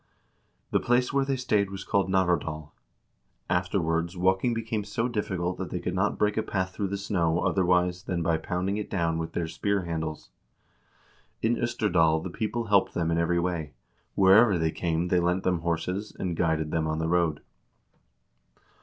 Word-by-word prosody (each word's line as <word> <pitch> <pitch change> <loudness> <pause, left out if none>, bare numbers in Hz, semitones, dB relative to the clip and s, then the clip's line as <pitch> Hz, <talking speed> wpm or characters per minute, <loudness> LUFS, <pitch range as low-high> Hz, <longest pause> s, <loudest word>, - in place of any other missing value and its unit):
The - - +3
place 125 +1 +1
where 140 -1 +2
they 135 0 0
stayed 105 -6 +1
was 95 0 -6
called 100 -1 +1
Navardal. 80 -5 0 0.8
Afterwards 90 -1 0
walking 95 +6 +2
became 110 -2 -2
so 115 +4 -2
difficult 95 -6 -2
that 95 - -4
they 90 - -3
could 90 - -3
not 95 +3 0
break 105 0 +1
a - - +3
path 95 -3 -2
through 100 - -2
the 100 +1 -3
snow 90 -4 0
otherwise 90 -2 +2
than 90 -2 -2
by 80 -1 +2
pounding 90 +5 -2
it 105 - -4
down 85 -3 0
with 80 0 -4
their 85 - -1
spear 100 +3 -1
handles. 80 -5 -4 1.1
In 115 +2 +3
0sterdal 90 -10 +1
the 90 - -5
people 115 +4 -2
helped 100 -3 +2
them 85 -1 0
in 85 - +1
every 85 +1 +1
way; 85 -5 -2 0.4
wherever 100 +1 +6
they 80 -1 0
came 85 +1 -1
they 90 - +3
lent 90 +2 0
them 90 -2 +1
horses, 85 +5 -3
and 90 -3 -2
guided 80 -2 0
them 80 -1 0
on 80 0 -1
the 80 0 -1
road. 85 -3 +1
90 Hz, 175 wpm, -27 LUFS, 85-100 Hz, 1.1 s, wherever